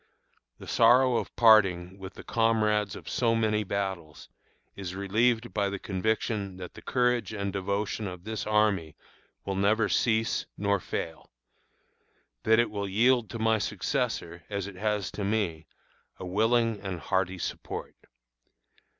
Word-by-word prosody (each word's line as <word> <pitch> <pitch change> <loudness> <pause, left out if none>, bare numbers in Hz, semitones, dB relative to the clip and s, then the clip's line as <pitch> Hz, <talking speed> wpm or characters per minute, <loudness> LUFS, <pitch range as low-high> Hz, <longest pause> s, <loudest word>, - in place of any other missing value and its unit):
The - - -11
sorrow 125 -1 +5
of - - -4
parting 95 -5 +4
with 95 0 -9
the - - -10
comrades 105 -3 +1
of - - -11
so 115 -2 +1
many 110 -1 +1
battles 95 -6 -4 0.5
is 95 -2 -6
relieved 110 +4 +1
by 100 -2 +1
the 100 - -4
conviction 100 0 -2
that 90 -1 -8
the - - -12
courage 125 -5 0
and 100 -2 -3
devotion 100 +2 -2
of 90 -2 -8
this 110 0 -4
army 105 -8 +1 0.5
will 100 - -2
never 105 +3 +2
cease 110 -1 +1
nor 100 -1 +1
fail; 80 -1 -5 1.1
that 110 0 +4
it 120 -2 +2
will 100 -1 -3
yield 120 +2 +3
to 115 - -5
my 110 0 +2
successor, 105 - -2
as 100 -2 -3
it 100 - -7
has 105 0 -1
to 105 - -5
me, 100 -7 -1 0.5
a - - -7
willing 110 +3 +1
and 95 -3 -4
hearty 95 -1 0
support. 85 - -5
105 Hz, 145 wpm, -28 LUFS, 95-110 Hz, 1.1 s, sorrow